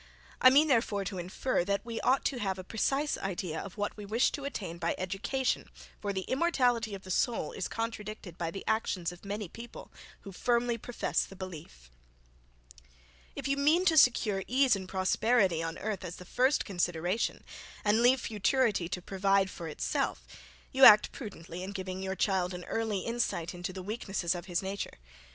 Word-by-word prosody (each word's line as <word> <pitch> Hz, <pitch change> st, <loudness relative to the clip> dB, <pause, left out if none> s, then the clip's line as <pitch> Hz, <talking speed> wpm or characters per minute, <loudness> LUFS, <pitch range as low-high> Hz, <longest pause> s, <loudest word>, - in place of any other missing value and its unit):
I 255 Hz, -, +10 dB
mean, 290 Hz, +4 st, +5 dB
therefore 225 Hz, -7 st, +1 dB
to 185 Hz, 0 st, -4 dB
infer, 180 Hz, +5 st, -1 dB
that 200 Hz, +2 st, -1 dB
we 230 Hz, -1 st, -4 dB
ought 265 Hz, +2 st, +2 dB
to 260 Hz, -, 0 dB
have 195 Hz, -3 st, -1 dB
a 185 Hz, -, -6 dB
precise 275 Hz, +9 st, 0 dB
idea 180 Hz, -4 st, -3 dB
of 200 Hz, +1 st, -9 dB
what 205 Hz, 0 st, -2 dB
we 210 Hz, -, -7 dB
wish 220 Hz, +5 st, +2 dB
to 280 Hz, -, -5 dB
attain 185 Hz, -11 st, -5 dB
by 170 Hz, -, 0 dB
education, 195 Hz, +8 st, -1 dB, 0.3 s
for 205 Hz, -, -1 dB
the 190 Hz, -1 st, -2 dB
immortality 245 Hz, -, +1 dB
of 195 Hz, -, -10 dB
the 185 Hz, -, -7 dB
soul 225 Hz, -4 st, 0 dB
is 185 Hz, -, -3 dB
contradicted 215 Hz, -5 st, -5 dB
by 170 Hz, -2 st, -3 dB
the 195 Hz, +4 st, -7 dB
actions 200 Hz, -6 st, 0 dB
of 175 Hz, -, -14 dB
many 205 Hz, 0 st, -4 dB
people, 235 Hz, +7 st, -10 dB, 0.3 s
who 200 Hz, -, -9 dB
firmly 240 Hz, +4 st, +1 dB
profess 245 Hz, +2 st, -1 dB
the 195 Hz, -, -10 dB
belief. 150 Hz, -, -9 dB, 1.4 s
If -, -, -4 dB
you 275 Hz, 0 st, +1 dB
mean 310 Hz, +6 st, +3 dB
to 330 Hz, -3 st, +4 dB
secure 230 Hz, -8 st, +4 dB
ease 260 Hz, -2 st, +4 dB
and 190 Hz, -1 st, -7 dB
prosperity 190 Hz, -1 st, +2 dB
on 165 Hz, 0 st, -4 dB
earth 205 Hz, -3 st, -3 dB
as 175 Hz, -1 st, -6 dB
the 180 Hz, -, -11 dB
first 260 Hz, +8 st, +2 dB
consideration, 175 Hz, +1 st, -1 dB, 0.4 s
and 210 Hz, +2 st, +4 dB
leave 250 Hz, +1 st, +5 dB
futurity 215 Hz, -4 st, +1 dB
to 180 Hz, -2 st, -4 dB
provide 195 Hz, 0 st, +2 dB
for 170 Hz, -, -7 dB
itself, 150 Hz, -, -2 dB, 0.5 s
you 265 Hz, 0 st, +2 dB
act 210 Hz, -4 st, +9 dB
prudently 180 Hz, -, -8 dB
in 190 Hz, +2 st, -5 dB
giving 190 Hz, -1 st, -5 dB
your 190 Hz, 0 st, -3 dB
child 185 Hz, -2 st, 0 dB
an 180 Hz, -, -7 dB
early 220 Hz, -2 st, -1 dB
insight 230 Hz, -8 st, -2 dB
into 180 Hz, +1 st, -5 dB
the 185 Hz, 0 st, -7 dB
weaknesses 195 Hz, -4 st, -2 dB
of 175 Hz, 0 st, -7 dB
his 175 Hz, 0 st, -1 dB
nature. 195 Hz, +1 st, -4 dB
200 Hz, 180 wpm, -30 LUFS, 185-235 Hz, 1.4 s, I